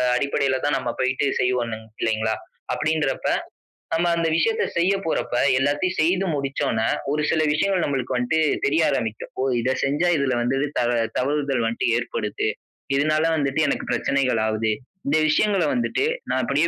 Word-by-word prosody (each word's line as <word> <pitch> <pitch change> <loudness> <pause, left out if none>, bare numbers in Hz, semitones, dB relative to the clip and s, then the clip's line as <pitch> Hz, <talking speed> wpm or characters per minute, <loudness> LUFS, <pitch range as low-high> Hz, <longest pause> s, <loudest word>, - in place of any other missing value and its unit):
அடிப்படையில 135 -1 +1
தான் 145 -2 +2
நம்ம 120 - -3
போயிட்டு 130 +2 +1
செய்வோம் 125 -3 0 0.3
இல்லைங்களா? 110 0 0 0.4
அப்படிங்கிறப்ப 155 -3 0 0.6
நம்ம 170 +2 +2
அந்த 165 -1 +1
விஷயத்தை 455 - +2
செய்ய 180 +3 +3
போறப்ப 160 - -1 0.2
எல்லாத்தையும் 145 +7 0
செய்து 180 +4 +2
முடிச்சனோ 135 -5 -1 0.3
1 150 +1 0
சில 155 - +2
விஷயங்கள் 185 +3 +1
நம்மளுக்கு 130 -3 -1
வந்துட்டு 125 +6 +1 0.3
தெரிய 155 +4 +2
ஆரம்பிக்கும். 110 -2 -3
"ஓ! - - +1 0.2
இத 130 +3 0
செஞ்சா 145 +6 +1
இதுல 135 -2 +1
வந்து 130 +3 0 0.2
த - - +2 0.4
தவறுதல் 140 -2 0
வந்துட்டு 115 +1 -1
ஏற்படுது. 105 -3 -2 0.5
இதனால, 155 +2 +2
வந்துட்டு 140 +1 0
எனக்கு - - -1
பிரச்சனைகள்லாவுது. 110 -5 +1 0.4
இந்த 150 +3 +3
விஷயங்கள 195 +2 +2
வந்துட்டு 120 - 0 0.2
நா - - +1
அப்படியே - - +2
140 Hz, 145 wpm, -23 LUFS, 125-155 Hz, 0.6 s, செய்ய